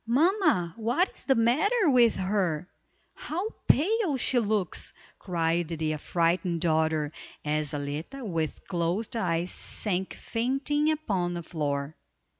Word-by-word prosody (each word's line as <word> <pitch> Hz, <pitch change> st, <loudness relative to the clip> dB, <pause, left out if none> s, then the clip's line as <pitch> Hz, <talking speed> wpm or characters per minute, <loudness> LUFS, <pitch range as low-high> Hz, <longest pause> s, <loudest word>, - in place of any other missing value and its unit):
"Mamma, 300 Hz, -, +3 dB
what 240 Hz, -, +1 dB
is -, -, -7 dB
the 270 Hz, -, +4 dB
matter 320 Hz, -, +3 dB
with 245 Hz, -5 st, +5 dB
her? 185 Hz, -4 st, 0 dB, 0.5 s
How 370 Hz, +8 st, -4 dB, 0.2 s
pale 370 Hz, -, +3 dB
she 250 Hz, 0 st, +3 dB
looks!" 210 Hz, -5 st, -1 dB, 0.3 s
cried 170 Hz, -2 st, 0 dB
the 160 Hz, -1 st, -2 dB
affrighted 170 Hz, +2 st, 0 dB
daughter, 160 Hz, -2 st, +1 dB, 0.3 s
as 150 Hz, 0 st, 0 dB
Zaletta 150 Hz, -, -5 dB
with 165 Hz, -6 st, -3 dB
closed 180 Hz, +6 st, -1 dB
eyes 175 Hz, -4 st, 0 dB
sank 190 Hz, -3 st, -1 dB
fainting 275 Hz, +6 st, 0 dB
upon 195 Hz, -, -1 dB
the 170 Hz, -, -4 dB
floor. 145 Hz, -2 st, -3 dB
185 Hz, 120 wpm, -28 LUFS, 165-265 Hz, 0.5 s, with